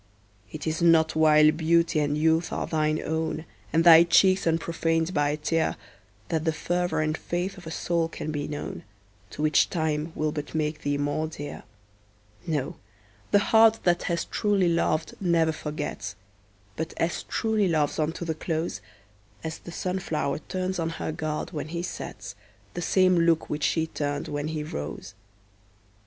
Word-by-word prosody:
It 155 - -6
is 160 +1 -1
not 160 -2 +4
while 155 -1 +6
beauty 165 0 +2
and 145 0 0
youth 160 +2 +2
are - - -2
thine 155 -1 0
own, 160 0 -2 0.3
And 165 +1 +3
thy 165 -1 +9
cheeks 185 +2 +4
unprofaned 165 +1 0
by 145 -3 +2
a 150 - -1
tear, 160 +1 0 0.5
That 160 -1 0
the 160 - +2
fervor 175 +2 -1
and 155 0 0
faith 175 +4 -3
of 175 -3 -11
a - - -4
soul 170 0 0
can 155 -1 -5
be 145 -1 -3
known, 145 -1 -6 0.5
To 150 - -5
which 155 -1 +4
time 160 -1 -1
will 155 0 0
but 150 0 -6
make 150 0 -1
thee 145 0 0
more 145 +2 -1
dear; 145 -2 -7 0.9
No, 150 -5 -2 0.5
the - - +5 0.2
heart 225 0 +6
that 175 -1 +2
has 170 -1 0
truly 200 -4 +1
loved 165 -1 0
never 170 -3 +3
forgets, 150 -1 -5 0.6
But 160 0 -4
as 165 +1 -1
truly 220 -3 0
loves 155 -4 +1
on 155 0 +1
to 170 - -6
the 160 - -1
close, 160 - -3 0.6
As 160 0 -5
the 170 - -10
sun 185 +2 -2
flower 150 -5 -2
turns 185 +3 -3
on 165 -1 0
her - - -3
god, 155 -1 -3
when 155 -3 -4
he 170 +2 -4
sets, - - -6 0.4
The 175 - -4
same 185 0 +3
look 165 -1 +2
which 150 0 -2
she 160 -1 +1
turned 145 -2 -3
when 145 +1 -3
he 155 -1 -3
rose. 95 - -6
160 Hz, 170 wpm, -26 LUFS, 155-170 Hz, 0.9 s, thy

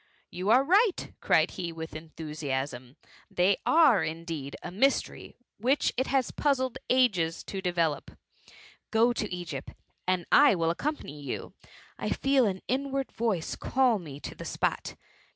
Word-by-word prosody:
You 185 +3 -3
are 250 +4 +6
right," 390 - +2
cried - - +3
he, 175 -3 -4
with 160 -1 -7
enthusiasm, 145 -5 -5 0.3
they 185 +2 +2
are, 310 - +5
indeed, 160 -3 -5
a - - -6
mystery 270 +9 0 0.2
which 260 +7 +2
it 260 - 0
has 270 -2 +1
puzzled 260 -4 0
ages 195 -11 +2
to 195 - -5
develope— 170 -5 -1 0.7
go 230 +2 +3
to 210 -3 -3
Egypt, 170 -6 -6 0.3
and 185 -2 +1
I 285 -6 +7
will 165 -1 +1
accompany 170 - -4
you. 140 - -5 0.5
I - - -2
feel 270 -3 +2
an 190 -2 -3
inward 270 +1 -1
voice 215 -8 -1
call 255 -5 +2
me 145 -5 -9
to - - -6
the - - -9
spot. - - -2
190 Hz, 145 wpm, -28 LUFS, 165-260 Hz, 0.7 s, I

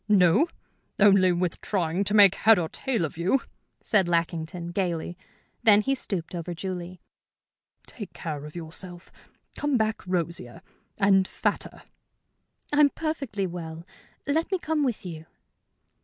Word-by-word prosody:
"No, 195 - +5 0.5
only 195 -2 +6
with 175 -1 -1
trying 180 -1 0
to 205 - 0
make 200 -3 +8
head 220 +2 +5
or 170 -2 0
tail 230 -1 -1
of 160 - -8
you," 190 +10 +2 0.4
said 195 -5 +2
Lackington, 170 0 -2
gayly. 175 -2 -2 0.5
Then 215 -3 +6
he 270 +5 0
stooped 190 -10 -3
over 175 0 -4
Julie. 180 0 -6 0.9
"Take 210 -5 -9
care 150 -4 -6
of 150 - -11
yourself. 175 +2 -8 0.4
Come 290 -3 0
back 220 -1 0
rosier 170 -8 -2 0.3
and 195 -2 +4
fatter." - - -2 0.9
"I'm 290 -1 +6
perfectly 275 -11 -3
well. 165 -2 -7 0.4
Let 320 +6 0
me 380 - +2
come 320 -3 -1
with 245 -7 -2
you." 160 -3 -8
185 Hz, 135 wpm, -26 LUFS, 170-215 Hz, 0.9 s, make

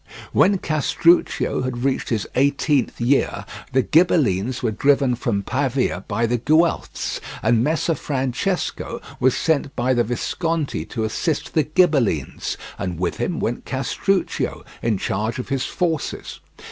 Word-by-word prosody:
When 195 +1 +4
Castruccio 165 +1 +2
had 125 -1 -3
reached 135 -1 0
his 110 -3 -1
eighteenth 140 0 +1
year, 125 +4 +1 0.3
the 130 0 +3
Ghibellines 130 - +2
were 115 - +1
driven 135 +3 +3
from 115 -4 -1
Pavia 130 -5 -1
by 115 +3 0
the 120 +1 0
Guelphs, 160 +7 +1 0.2
and 115 +1 +3
Messer 160 +3 +1
Francesco 135 +6 -2 0.2
was 130 0 +3
sent 145 -4 0
by 125 +2 +1
the 120 -1 +3
Visconti 155 +6 -2
to 115 - -4
assist 145 +8 -2
the 160 - +4
Ghibellines, 140 - +1 0.2
and 90 -2 -3
with 90 -1 -1
him - - -2
went - - -2
Castruccio, - - -1 0.2
in 115 -3 +1
charge 110 +4 -2
of 125 - -5
his 135 -2 0
forces. 165 -5 -2
130 Hz, 135 wpm, -22 LUFS, 115-155 Hz, 0.3 s, When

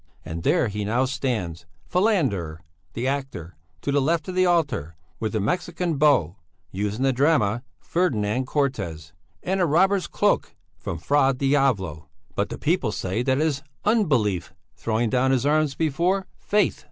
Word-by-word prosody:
And 80 +1 -5
there 115 - +2
he 105 0 -3
now 120 +6 +1
stands, 105 - -3 0.2
Falander, 140 - +1 0.4
the 120 - -3
actor, 130 - -4 0.3
to 140 - 0
the 140 0 +3
left 160 +2 0
of 185 - -4
the 185 0 +3
altar, 145 - 0 0.2
with 110 -1 -2
a - - +2
Mexican 170 - -1
bow 130 - +3 0.3
(used 105 +2 -2
in 130 - -1
the 135 -1 +3
drama 120 -6 +2 0.2
Ferdinand 130 - 0
Cortez) 95 - -2 0.3
and 190 +1 0
a 175 - +3
robber's 190 +5 +3
cloak - - 0 0.2
(from 85 - -4
Fra 135 - +2
Diavolo), 120 - +1 0.2
but - - -1
the - - -5
people 150 -9 0
say 95 +2 -2
that 130 +1 +1
it 155 - +2
is 140 -3 -1 0.2
Unbelief 120 - +1 0.2
throwing 115 0 -1
down 130 +1 +2
his 130 -1 +2
arms 150 -1 +2
before 170 +5 +1
Faith. 205 -1 +1
130 Hz, 160 wpm, -24 LUFS, 105-155 Hz, 0.4 s, the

